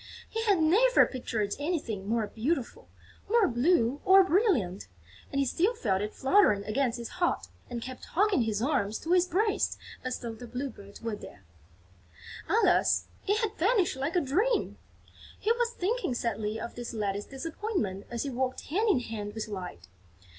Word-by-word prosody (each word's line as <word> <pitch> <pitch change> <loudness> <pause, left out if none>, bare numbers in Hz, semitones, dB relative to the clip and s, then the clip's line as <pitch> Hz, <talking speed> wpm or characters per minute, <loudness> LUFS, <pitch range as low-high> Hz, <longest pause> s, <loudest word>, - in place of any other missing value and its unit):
He 450 - -3
had 400 -5 +4
never 420 +11 +5
pictured 220 -5 -2
anything 285 - -2
more 230 -1 +1
beautiful, 250 +5 -3 0.4
more 455 -3 +4
blue 255 0 +2
or 385 0 +7
brilliant; 335 - +1 0.4
and 275 - -3
he 275 - +3
still 370 - +1
felt 195 - 0
it 210 +1 -4
fluttering 265 - +4
against 235 +3 0
his 235 -1 -5
heart 350 - +1 0.2
and 240 -2 -4
kept 255 0 -8
hugging 400 -4 +2
his 220 -1 -1
arms 235 -7 0
to 330 - -5
his 360 0 +4
breast 400 +4 +1 0.3
as 255 -1 -2
though 235 -1 -6
the 240 +2 -10
Blue 255 +3 -4
Bird 200 -2 -13
were 230 -2 -2
there. 100 - -12 1.1
Alas, 450 +3 +3 0.2
it 415 +3 +2
had 430 -1 -1
vanished 385 - +2
like 280 +7 -2
a 355 - +4
dream! 395 - 0 0.6
He 440 - +1
was 475 0 +1
thinking 425 - -1
sadly 220 -2 -2
of 235 - -6
this 240 -1 -6
latest 205 -1 -2
disappointment 275 - -3
as 235 -1 -3
he 280 - -3
walked 260 +1 -2
hand 425 +7 +2
in 280 -11 +3
hand 210 -3 -6
with 220 - -4
Light. 180 - -7
260 Hz, 170 wpm, -29 LUFS, -, 1.1 s, or